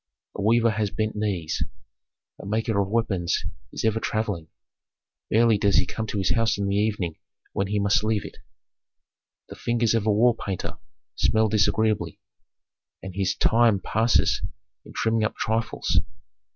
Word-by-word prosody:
A - - -4
weaver 115 +2 +4
has 105 -1 -1
bent 110 +2 -2
knees, 100 -7 -2 0.8
a - - -10
maker 110 0 0
of 100 - -1
weapons 100 -5 0 0.3
is - - -4
ever 110 0 +2
travelling: 105 -8 -2 0.8
barely 115 -1 +4
does 100 -1 +2
he 95 - +4
come 110 +4 -4
to 105 - -3
his 95 -2 +1
house 115 -3 +1
in 100 -1 -1
the 100 - 0
evening 100 -6 -1 0.3
when 95 - 0
he 105 +1 -1
must 100 +1 +2
leave 110 -1 0
it. - - -10 1.1
The - - -8
fingers 120 -1 +1
of 110 -2 0
a - - +5
wall 120 +4 +4
painter 95 -5 -5 0.3
smell 110 0 +2
disagreeably, 110 0 +1 0.8
and 95 -1 -6
his 95 0 0
time 115 -3 +4
passes 110 +5 +2 0.4
in - - -13
trimming 110 -1 +1
up 105 - -1
trifles. 115 +1 0
110 Hz, 155 wpm, -25 LUFS, 100-110 Hz, 1.1 s, a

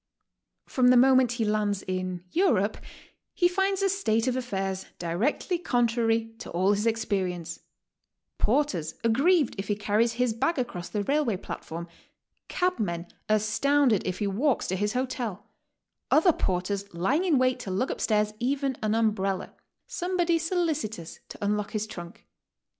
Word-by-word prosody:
From 255 -1 +2
the 250 0 +7
moment 260 -1 +5
he 235 -2 -1
lands 210 -2 0
in 185 -1 -3
Europe 375 +3 +2 0.6
he 350 - +4
finds 385 +2 0
a 390 - +3
state 230 - +1
of 255 -1 0
affairs 195 -6 -3
directly 215 - -1
contrary 230 -5 +1
to 245 - -8
all 185 +4 +2
his 210 +3 0
experience, 185 -7 -2 0.4
— - - -56
porters 205 - +1
ag 230 - +4
grieved 310 +2 +3
if 195 - -4
he 205 - +1
carries 215 +3 +1
his 245 -1 +1
bag 295 +9 0
across 180 -9 -3
the 205 -1 -2
railway 275 -4 +1
platform, 170 -1 -7 0.6
cabmen 205 - -1 0.2
astounded 225 +3 +3
if 185 -1 -3
he 210 - -1
walks 235 +8 +1
to 185 - -1
his 205 +2 -1
hotel, 250 -6 -3 0.6
other 330 +2 +5
porters 195 0 -2
lying 250 - +1
in 340 -7 +3
wait 255 0 +2
to - - -6
lug 195 +8 0
up - - -5
stairs 210 -1 +1
even 270 +2 0
an 215 0 +1
umbrella, 210 -4 0 0.3
somebody 350 -2 0
solicitous 310 - -2
to - - -10
unlock 210 0 -1
his 215 -1 -1
trunk. 175 -4 -10
225 Hz, 155 wpm, -27 LUFS, 195-275 Hz, 0.6 s, the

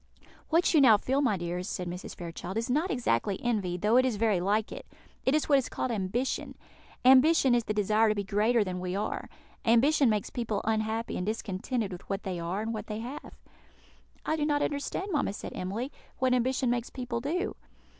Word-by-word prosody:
"What 335 +3 +3
you 310 - +6
now 230 -6 +7
feel, 265 +6 0
my 235 -8 +2
dears," 175 +2 -4
said 180 -2 -4
Mrs. 180 +1 -6
Fairchild, 175 +3 -6
"is 230 +2 -1
not 310 +8 +1
exactly 200 - 0
envy, 205 -7 0
though 210 +6 +3
it 255 - +6
is 255 -4 0
very 210 -3 +2
like 210 +3 0
it; - - -8 0.4
it 265 - +4
is 310 - +1
what 280 -2 +5
is 260 - -4
called 255 - -2
ambition. 225 +5 -2 0.5
Ambition 265 +1 +6
is 240 -2 +2
the 215 - -1
desire 215 +2 +3
to 215 - +1
be 200 - -2
greater 215 +3 +2
than 185 -2 -4
we 180 0 -3
are. 205 - -3 0.3
Ambition 260 +4 +4
makes 210 -2 -1
people 225 -4 -2
unhappy 220 +1 -1
and 180 - -3
discontented 215 +1 -2
with 180 - -9
what 195 0 -2
they 185 -3 -3
are 175 +5 -2
and 225 +1 -3
what 215 - -5
they 215 - -4
have." 245 +6 -7 0.9
"I 315 - +1
do 305 - -1
not 290 -1 +1
exactly - - +3
understand, 375 +7 -4
mamma," 290 - 0
said - - -7
Emily, 215 +9 -4 0.3
"what 260 -1 +2
ambition 255 0 +1
makes 240 -1 -1
people 245 -3 -4
do." 355 - -2
225 Hz, 205 wpm, -29 LUFS, 200-260 Hz, 0.9 s, now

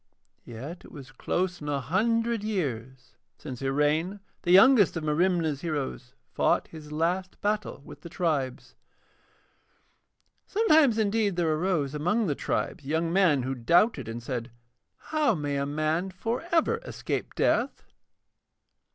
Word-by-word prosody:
Yet 135 +10 -8
it - - -14
was 135 -3 -11
close 175 +7 -2
on 145 - -5
a 140 -1 0
hundred 230 - 0
years 130 - -4 0.2
since 130 -4 -8
Iraine, 150 +8 0 0.2
the 175 - -4
youngest 200 -1 +6
of 160 - -4
Merimna's 160 -1 +1
heroes, 145 - -4 0.2
fought - - +1
his 155 -2 -11
last 175 +4 -1
battle 210 -8 -2
with - - -12
the 170 - -9
tribes. 145 -7 -2 1.7
Sometimes 315 - +4
indeed 210 -2 +1
there 165 -3 +1
arose 155 -4 0
among 180 +10 0
the 155 - 0
tribes 140 - -3
young 160 +4 -1
men 170 -9 +3
who 130 +2 -2
doubted 135 - +2
and 115 +1 -6
said: 120 -1 -4 0.5
'How 305 -8 0
may 145 -3 -2
a 140 0 -1
man 155 +5 -1
for 230 - -3
ever 340 +8 +2
escape - - -5
death?' - - +1
165 Hz, 135 wpm, -27 LUFS, 140-200 Hz, 1.7 s, youngest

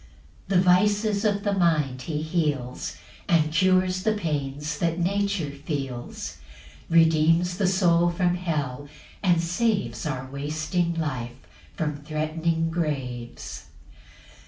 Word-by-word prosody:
4 195 - +3
The 180 - +5
vices 205 +3 +3
of 205 -1 +1
the 205 - +1
mind 155 -8 +1
he 150 +3 -3
heals, 150 -6 -2 0.3
And 155 -2 +3
cures 185 +1 +3
the 215 +2 +2
pains 150 -5 -3
that 165 -1 0
nature 195 -3 0
feels; 140 -4 -5 0.5
Redeems 165 +2 +4
the 195 - +3
soul 175 -2 +3
from 175 0 +1
hell, 145 -6 -2 0.3
and 175 -4 +3
saves 170 - 0
Our 130 -3 -3
wasting 155 +5 -2
life 130 -7 -3 0.4
from 150 -4 -1
threat'ning 160 +2 -1
graves. 130 -8 -4
165 Hz, 115 wpm, -25 LUFS, 145-180 Hz, 0.5 s, The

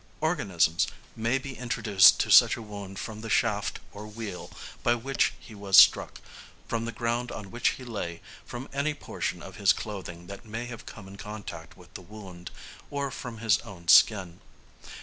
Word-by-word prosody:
Organisms 95 - +1 0.3
may 115 +4 0
be 135 0 -7
introduced 110 -6 +5
to - - -1
such - - +7
a - - -7
wound 100 -2 -8
from 110 +2 -6
the 115 - -7
shaft - - 0
or 105 +1 -9
wheel 105 -4 -7 0.3
by 120 - +3
which 130 +3 0
he 115 - -14
was 100 -2 +2
struck, - - +6 0.5
from 115 0 -2
the 115 - -3
ground 120 +2 -2
on 100 -1 -8
which 120 +1 0
he 130 - -10
lay, 100 -8 -5 0.2
from 120 +2 -8
any 145 +2 -1
portion - - -5
of - - -10
his - - +4
clothing 90 -5 -7
that 100 +4 -10
may 115 +1 -6
have 120 -2 -9
come 105 -4 -10
in 100 +1 -11
contact 105 0 -9
with - - -18
the - - -8
wound, 90 -2 -11 0.4
or 140 -1 -3
from 120 -3 -7
his 110 -1 +2
own 85 -4 -12
skin. 90 -2 +5
110 Hz, 180 wpm, -27 LUFS, 95-120 Hz, 0.5 s, such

